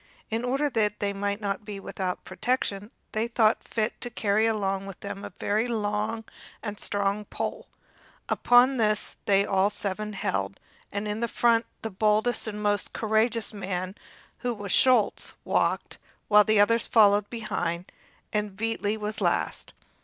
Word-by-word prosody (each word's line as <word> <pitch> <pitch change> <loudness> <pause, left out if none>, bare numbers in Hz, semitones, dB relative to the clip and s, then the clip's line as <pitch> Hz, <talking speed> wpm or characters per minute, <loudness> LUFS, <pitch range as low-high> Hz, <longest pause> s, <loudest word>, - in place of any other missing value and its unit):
In 225 +2 -1
order 270 +4 +1
that 210 -6 0
they 200 -1 -1
might 200 +1 -2
not 200 0 -2
be 205 -1 -6
without 190 -2 -4
protection, 210 -5 -1 0.2
they 220 +2 0
thought 230 -2 +2
fit 220 0 -2
to 245 - -3
carry 215 -1 +2
along 195 -3 -1
with 195 - -9
them 200 0 -6
a - - -5
very 215 +4 +1
long 215 0 -1 0.4
and 210 -2 -5
strong 200 +1 0
pole. - - -4 0.6
Upon 250 +2 +5
this 215 -2 0
they 200 0 +4
all 195 0 +2
seven 210 +1 -3
held, 100 - -2 0.3
and 205 +1 -3
in 215 +3 -1
front 235 0 +2 0.2
the 225 - -3
boldest 215 +5 +2
and 210 -1 -4
most 205 0 0
courageous 220 +1 +1
man, 185 -2 -3 0.5
who 245 -1 -2
was 205 -2 -5
Schulz, 250 -3 +3
walked, - - 0 0.3
while 210 0 +8
the 215 -1 +3
others 230 +3 +4
followed 205 -2 +5
behind, 180 -6 -3 0.4
and 210 -2 -1
Veitli 220 -1 -1
was 210 0 -4
last. - - 0
210 Hz, 155 wpm, -27 LUFS, 200-225 Hz, 0.6 s, while